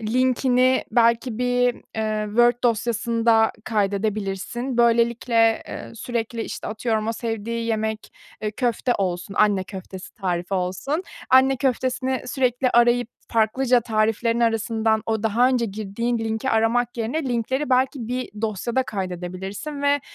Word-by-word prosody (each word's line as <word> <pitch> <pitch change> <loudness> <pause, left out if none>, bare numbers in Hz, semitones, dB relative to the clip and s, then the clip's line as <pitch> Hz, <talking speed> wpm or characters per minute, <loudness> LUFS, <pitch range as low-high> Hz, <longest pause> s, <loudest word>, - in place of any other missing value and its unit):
linkini 255 +2 +2
belki 235 -1 +2
bir, 245 0 +2 0.2
eee, 215 -1 -1
Word 240 +3 +4
dosyasında 230 -1 +2
kaydedebilirsin. 210 +3 -2
Böylelikle, 235 -1 +3
eee, - - -7
sürekli, 230 0 -3
işte, - - -6
atıyorum 220 0 -1
o 225 - +1
sevdiği 230 0 -3
yemek, 220 -1 -2 0.3
eee, 215 - -1
köfte 240 +2 0
olsun, 185 0 -2
anne 205 -3 +3
köftesi 190 -1 -9
tarifi 180 -1 -2
olsun, 190 - -2 0.3
anne, 260 +1 +5
köftesini 255 0 -1
sürekli 250 0 +1
arayıp, 240 0 +3 0.2
farklıca 240 +3 +3
tariflerin 225 +1 0
arasından 225 -1 +1
o 220 -1 -1
daha 230 +4 +3
önce 250 -3 +1
girdiğin 220 +4 -2
linki 225 +3 -2
aramak 235 +2 +1
yerine 240 +7 -2
linkleri 260 +4 -1
belki 255 -2 +1
bir 250 +1 -3
dosyada 225 +4 0
kaydedebilirsin 190 - -5
ve, 285 0 +3
230 Hz, 125 wpm, -23 LUFS, 215-245 Hz, 0.3 s, anne